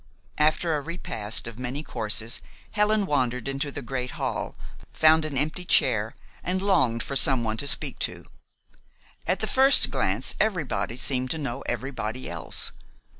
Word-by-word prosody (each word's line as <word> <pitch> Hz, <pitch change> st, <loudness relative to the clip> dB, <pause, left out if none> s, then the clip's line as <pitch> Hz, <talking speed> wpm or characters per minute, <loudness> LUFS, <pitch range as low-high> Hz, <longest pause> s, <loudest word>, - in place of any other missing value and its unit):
After 155 Hz, +2 st, +2 dB
a 145 Hz, -, -2 dB
repast 140 Hz, -10 st, -2 dB
of 115 Hz, 0 st, -6 dB
many 130 Hz, +4 st, -4 dB
courses 115 Hz, -3 st, 0 dB, 0.3 s
Helen 210 Hz, 0 st, +2 dB
wandered 125 Hz, -6 st, -1 dB
into 135 Hz, +1 st, -2 dB
the 145 Hz, -, -7 dB
great 125 Hz, 0 st, -4 dB
hall, -, -, -3 dB, 0.4 s
found 160 Hz, 0 st, +4 dB
an 145 Hz, -3 st, -4 dB
empty 155 Hz, +6 st, -1 dB
chair, 110 Hz, -9 st, +2 dB, 0.3 s
and 185 Hz, +2 st, -1 dB
longed 165 Hz, -, +2 dB
for 140 Hz, -, -4 dB
someone 120 Hz, -5 st, +4 dB
to 140 Hz, -, -3 dB
speak -, -, 0 dB
to. -, -, -3 dB, 1.0 s
At -, -, 0 dB
the -, -, +1 dB
first 270 Hz, +1 st, +6 dB
glance, -, -, 0 dB
everybody 145 Hz, -, -1 dB
seemed 130 Hz, -1 st, 0 dB
to 160 Hz, -, -1 dB
know 135 Hz, -3 st, -4 dB
everybody 130 Hz, -2 st, -4 dB
else. 85 Hz, -1 st, -3 dB
135 Hz, 150 wpm, -25 LUFS, 120-160 Hz, 1.0 s, first